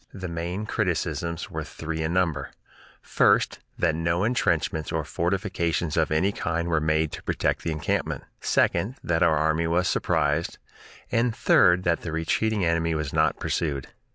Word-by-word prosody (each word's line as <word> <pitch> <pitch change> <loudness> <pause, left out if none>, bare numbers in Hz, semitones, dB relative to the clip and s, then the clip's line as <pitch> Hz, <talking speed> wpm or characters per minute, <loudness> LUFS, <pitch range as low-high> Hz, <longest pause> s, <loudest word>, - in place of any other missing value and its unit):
The 95 -2 -5
main 85 +4 -4
criticisms 85 -5 -2
were - - -3
three 80 0 -5
in 80 +1 -1
number: 80 -6 0 0.5
first, - - +2 0.2
that 85 -3 +2
no 85 +3 0
intrenchments 105 -8 0
or 80 -1 -1
fortifications 85 0 -1
of 80 -3 +2
any 80 +6 +2
kind 85 -3 -2
were 80 -2 +2
made 80 0 +1
to - - -7
protect - - -1
the - - -3
encampment; 80 -2 -2 0.2
second, 115 +7 +1
that 80 0 0
our 80 -3 +4
army 80 +2 +1
was 90 +2 +1
surprised; 75 0 0 0.5
and, 115 -1 +1
third, 90 +1 +4
that 85 -2 +1
the 80 - -5
retreating 95 +5 0
enemy 85 -1 +1
was 75 -2 -3
not - - +2
pursued. 70 -5 -2
85 Hz, 155 wpm, -25 LUFS, 80-90 Hz, 0.5 s, our